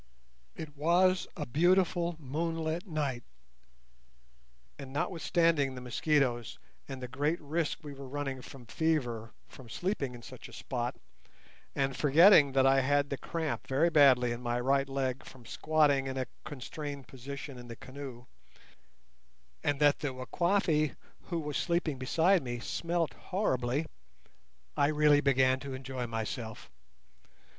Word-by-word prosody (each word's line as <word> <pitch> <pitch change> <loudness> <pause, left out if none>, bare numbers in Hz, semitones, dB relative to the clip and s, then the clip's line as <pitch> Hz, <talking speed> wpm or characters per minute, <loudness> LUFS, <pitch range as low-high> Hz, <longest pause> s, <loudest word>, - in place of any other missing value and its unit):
It 150 -2 -8
was 175 +5 +3
a 150 - -3
beautiful 175 +4 +2
moonlight 160 +4 -3
night, 140 -7 -2 1.6
and, 135 -1 -8
notwithstanding 165 -2 +1
the 125 - -7
mosquitoes, 120 - 0 0.3
and 130 -2 -7
the - - -3
great 145 +7 -1
risk 155 +2 -2
we 145 -1 -7
were 135 -1 -9
running 135 -1 -4
from 125 -1 -12
fever 120 -6 -1 0.2
from 125 -3 -14
sleeping 140 - -2
in 120 - -12
such - - -10
a - - -15
spot, - - -3 0.8
and 135 -1 0
forgetting 150 0 +6
that 135 -1 +4
I 135 0 +5
had 145 +1 +1
the 140 - -1
cramp 160 -3 -3
very 150 +6 +2
badly 130 -5 +5
in 120 +1 -4
my 120 0 -1
right 135 +2 +1
leg 135 -1 -2
from 125 -3 -14
squatting 145 0 +2
in 135 0 -4
a 130 - -1 0.2
constrained 145 0 -6
position 135 +1 -8
in 120 - -10
the 115 - -8
canoe, 130 -1 -9 1.4
and 145 -1 0
that 145 -1 +4
the 135 -3 -3
Wakwafi 155 +2 +1 0.3
who 170 -2 -2
was 150 -2 -3
sleeping 170 -6 0
beside 165 +8 +3
me 120 -2 -4
smelt 165 +6 -2
horribly, 145 - -1 0.9
I 140 - +3
really 150 -1 +4
began 130 -2 +3
to 135 0 -6
enjoy 130 -1 -5
myself. 110 - -5
140 Hz, 140 wpm, -31 LUFS, 130-160 Hz, 1.6 s, forgetting